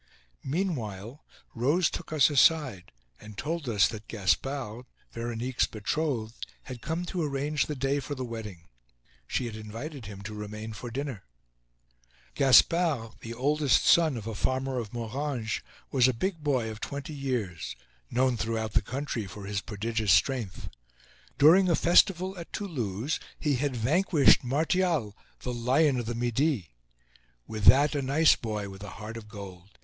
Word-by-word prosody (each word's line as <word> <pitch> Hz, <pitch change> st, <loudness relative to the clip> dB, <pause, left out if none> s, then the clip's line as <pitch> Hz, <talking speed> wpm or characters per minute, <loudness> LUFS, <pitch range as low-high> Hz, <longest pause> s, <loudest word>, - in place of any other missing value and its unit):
Meanwhile, 130 Hz, -, -3 dB, 0.3 s
Rose 145 Hz, +9 st, +2 dB
took -, -, -6 dB
us 155 Hz, -2 st, +4 dB
aside 130 Hz, -, +3 dB, 0.3 s
and 105 Hz, -1 st, -12 dB
told 155 Hz, -3 st, -3 dB
us 100 Hz, -4 st, +4 dB
that 110 Hz, -1 st, -8 dB
Gaspard, 120 Hz, +3 st, -1 dB, 0.2 s
Veronique's 120 Hz, +2 st, -1 dB
betrothed, 115 Hz, 0 st, -2 dB, 0.2 s
had 125 Hz, -3 st, -8 dB
come 165 Hz, +3 st, -3 dB
to 180 Hz, 0 st, -3 dB
arrange 145 Hz, 0 st, -1 dB
the 150 Hz, -, -3 dB
day 135 Hz, +1 st, 0 dB
for 145 Hz, +1 st, -5 dB
the 130 Hz, -1 st, -4 dB
wedding. 105 Hz, -8 st, -8 dB, 0.6 s
She 130 Hz, -, -1 dB
had 115 Hz, -2 st, -5 dB
invited 115 Hz, -, -7 dB
him 100 Hz, -1 st, -9 dB
to 105 Hz, +2 st, -6 dB
remain 105 Hz, +1 st, -6 dB
for 120 Hz, +3 st, -7 dB
dinner. 130 Hz, -2 st, -5 dB, 1.1 s
Gaspard, 140 Hz, -2 st, +4 dB
the 115 Hz, +1 st, -7 dB
oldest 145 Hz, +2 st, +2 dB
son 160 Hz, -6 st, +5 dB
of 110 Hz, -, -7 dB
a 115 Hz, -, -4 dB
farmer 130 Hz, +3 st, -1 dB
of 110 Hz, -3 st, -6 dB
Moranges, 120 Hz, -1 st, -3 dB, 0.3 s
was 130 Hz, -2 st, +5 dB
a 130 Hz, -, +1 dB
big 170 Hz, -, -2 dB
boy 130 Hz, -6 st, 0 dB
of 110 Hz, -, -9 dB
twenty 140 Hz, +2 st, -5 dB
years, 105 Hz, -, -3 dB, 0.3 s
known 125 Hz, -1 st, +2 dB
throughout 110 Hz, -1 st, -2 dB
the 115 Hz, -, +4 dB
country 125 Hz, -2 st, -4 dB
for 100 Hz, +1 st, -9 dB
his 100 Hz, 0 st, -2 dB
prodigious 110 Hz, 0 st, -1 dB
strength. 105 Hz, +3 st, +1 dB, 0.7 s
During 180 Hz, +6 st, +6 dB
a 170 Hz, -, +4 dB
festival 185 Hz, +2 st, +4 dB
at 170 Hz, -, -9 dB
Toulouse 130 Hz, -, -3 dB, 0.2 s
he 145 Hz, -4 st, +1 dB
had 140 Hz, 0 st, -1 dB
vanquished 145 Hz, -, +4 dB
Martial, 155 Hz, -, +1 dB, 0.3 s
the 125 Hz, -, -3 dB
"Lion 130 Hz, +3 st, +2 dB
of 120 Hz, -, -4 dB
the 120 Hz, -, -2 dB
Midi." 120 Hz, -, 0 dB, 0.7 s
With 110 Hz, -1 st, -5 dB
that, 145 Hz, +2 st, +7 dB
a 145 Hz, -, 0 dB
nice 145 Hz, +4 st, +4 dB
boy, 105 Hz, -3 st, -4 dB
with 95 Hz, 0 st, -10 dB
a 105 Hz, -, -7 dB
heart 110 Hz, +1 st, -7 dB
of 115 Hz, -2 st, -8 dB
gold. 100 Hz, -2 st, -11 dB
125 Hz, 155 wpm, -28 LUFS, 110-145 Hz, 1.1 s, that